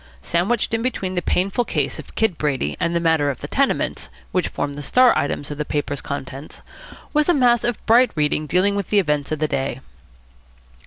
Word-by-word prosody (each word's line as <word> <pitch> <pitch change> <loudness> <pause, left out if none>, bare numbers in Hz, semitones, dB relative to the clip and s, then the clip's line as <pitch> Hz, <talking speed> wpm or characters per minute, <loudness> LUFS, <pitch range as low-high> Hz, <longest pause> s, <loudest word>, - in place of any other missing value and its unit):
Sandwiched 200 +8 0
in 225 - +1
between 225 -7 -2
the 180 - -1
painful 195 +7 0
case - - -2
of - - -11
Kid 220 -6 +1
Brady 130 - -1
and 170 0 0
the - - +3
matter 160 -3 +2
of 135 - -4
the - - -5
tenements, 275 0 0 0.2
which 185 - 0
formed 145 - -3
the 145 - -7
star 250 - +4
items 145 0 -2
of 145 - -6
the - - +1
paper's 145 -1 -3
contents, 140 +1 -7 0.5
was 300 +2 +2
a 350 - +5
mass 240 -3 +3
of 240 -1 0
bright 240 +3 +5
reading 150 0 0
dealing 185 +5 +2
with 200 -3 -3
the 210 - +2
events 150 -7 +1
of 155 - 0
the 155 +1 0
day. 135 -3 -2
170 Hz, 205 wpm, -21 LUFS, 145-230 Hz, 0.5 s, a